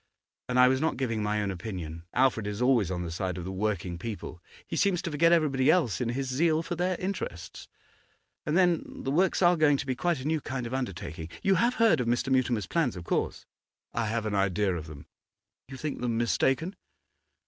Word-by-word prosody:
And 125 - 0
I 125 - +8
was 130 +1 +2
not 160 - 0
giving 115 -4 -1
my 105 0 0
own 100 - -1
opinion; 85 -4 -6
Alfred's 125 -5 +2
is 105 0 -5
always 125 -6 +3
on 90 -1 -2
the 85 - -5
side 90 +2 -3
of 90 - -5
the 95 - -5
working 95 -3 -2
people; 100 -5 -6 0.2
he - - -5
seems 200 -4 +2
to 170 - -3
forget 165 +3 +4
everybody 145 -6 +3
else 150 - +2
in 120 - 0
his 135 +3 -2
zeal 155 +5 +2
for 175 - -4
their 180 +1 0
interests. 140 - -5 0.8
And 150 +3 0
then, 175 -3 +3 0.2
the 135 - -1
works 185 +5 +2
are 175 0 +6
going 150 -3 +4
to 135 - -4
be 130 - -1
quite 170 +3 0
a 130 - -7
new 155 0 0
kind 130 -2 -4
of 120 - -5
undertaking. 85 -10 -4
You 195 - +4
have 235 +6 +2
heard 230 - +4
of 125 - -1
Mr. 120 +3 0
Mutimer's 125 -5 +2
plans 140 - 0
of 90 - -7
course?' - - -2 0.5
'I 115 -1 -1
have 115 +1 -1
an 105 - -2
idea 100 0 +1
of 80 -2 -6
them.' 75 -2 -10 0.6
'You 135 0 -9
think 150 -1 -4
them 120 -2 0
mistaken? 135 - +1
125 Hz, 215 wpm, -28 LUFS, 100-155 Hz, 0.8 s, I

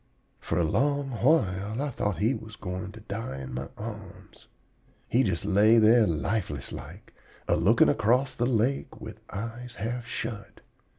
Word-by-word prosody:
"For - - -2
a 85 - +3
long 140 - +1
while 110 - +1
I 145 0 -1
thought 105 -6 -2
he 110 +9 +2
was 110 -4 -8
going 90 0 -5
to 110 - -11
die 100 -10 -5
in 65 -1 -7
my 65 +2 -4
arms. 105 -3 -9 0.6
He 125 - +3
just 95 -7 -1
lay 105 +3 +5
there 110 0 +6
lifeless 95 +7 -2
like, - - -10 0.3
a - - +3
looking 100 +9 +4
across 125 +4 +2
the 120 - 0
lake 125 +3 0
with - - -9
eyes 115 +4 -6
half 120 +3 -4
shut. 115 -4 -6
110 Hz, 160 wpm, -27 LUFS, 100-120 Hz, 0.6 s, there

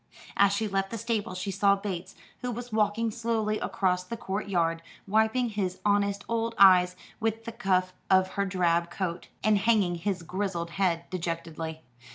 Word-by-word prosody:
As 200 0 +5
she 215 +2 0
left 195 -1 -1
the 230 - -4
stable 220 -4 -2
she 190 +2 -3
saw 200 +1 +4
Bates, 190 -2 -5 0.2
who 250 - -3
was 245 0 -5
walking 220 +1 +1
slowly 220 -2 -1
across 180 -2 0
the 230 +6 -6
court 200 -2 -4
yard, 165 -3 +1 0.3
wiping 220 +4 +2
his 195 -4 -2
honest 200 -1 +2
old 230 0 -1
eyes 180 -2 +7 0.2
with 225 0 -1
the 230 - -4
cuff 185 -5 0 0.2
of 185 0 +4
his 200 -1 -1
drab 170 -2 +1
coat, 175 -1 -4 0.2
and 210 -1 +4
hanging 205 -4 +3
his 180 +1 -2
grizzled 175 -1 -3
head 170 -2 0
dejectedly. 165 -2 -4
195 Hz, 170 wpm, -28 LUFS, 180-215 Hz, 0.3 s, eyes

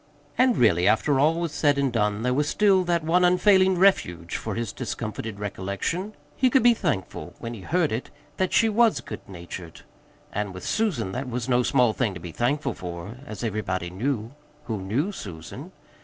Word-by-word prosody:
And, 255 -2 +3
really, 90 -6 +4
after 110 +6 +3
all 155 +4 +4
was 170 -2 -2
said 145 -1 +2
and 135 -3 +1
done, 105 -1 0
there 125 0 +1
was 145 +3 +1
still 195 -3 +4
that 170 -2 +1
one 175 +3 +3
unfailing 185 +1 +4
refuge 90 - +2
for 110 -3 -3
his 115 -3 -3
discomforted 110 -4 -5
recollection: 105 - -3 0.2
he 260 - +3
could 260 0 +3
be 240 0 +7
thankful, 150 - -3
when 115 - -6
he 110 - -8
heard 170 - +1
it, 115 +3 -3 0.3
that 185 -1 0
she 225 - +4
was 225 +1 +3
good - - -8
natured; 85 -2 -9 0.5
and 100 -2 -3
with 90 - -8
Susan 170 - 0
that 130 +4 -4
was 125 0 -3
no 125 -1 +3
small 120 -2 +3
thing 110 -6 -1
to - - -6
be 85 0 -8
thankful 135 - 0
for, 90 +6 -7
as 110 +2 -7
everybody 95 -5 -2
knew 115 +3 -2 0.3
who 110 -7 -3
knew 125 - -1
Susan. 85 - -8
120 Hz, 185 wpm, -25 LUFS, -, 0.5 s, be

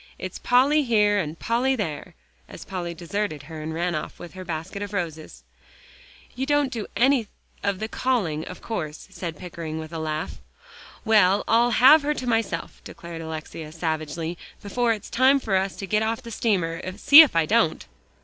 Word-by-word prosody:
It's 185 - -6
Polly 275 +5 +4
here, 210 -5 +3
and 160 -3 -4
Polly 250 +7 +1
there," 165 - -5 0.3
as - - -10
Polly 175 -3 -5
deserted 170 -3 -3
her 155 +1 -8
and 155 +1 -5
ran 170 +2 -1
off 155 - -5
with 175 - -10
her 185 0 -8
basket 165 +3 -5
of 205 0 -5
roses. 160 - -5 0.9
"You 265 +2 -3
don't 290 -2 +2
do 225 -3 -4
any 255 -3 +3 0.3
of 200 -1 -1
the 220 - -4
calling, 210 -12 -1
of 180 - -10
course," 155 -9 -5
said 170 -4 -6
Pickering, 165 -3 -6
with 160 +1 -7
a 165 - -4
laugh. 155 0 -4 0.7
"Well, 205 -3 +4
I'll 235 +2 +4
have 295 +5 +8
her 300 +1 -1
to 255 - -5
myself," 225 -8 -2
declared 170 -1 -9
Alexia 160 -1 -7
savagely, 160 +1 -3 0.2
"before 235 +4 0
it's 210 -2 -4
time 265 +3 +4
for 215 -7 -1
us 190 0 0
to 195 - -6
get 210 +2 +1
off 220 +1 -1
the 230 - -9
steamer, 180 -8 0 0.2
see 285 +8 +10
if 295 - +3
I 165 -1 +3
don't." 210 - +1
190 Hz, 180 wpm, -24 LUFS, 165-230 Hz, 0.9 s, see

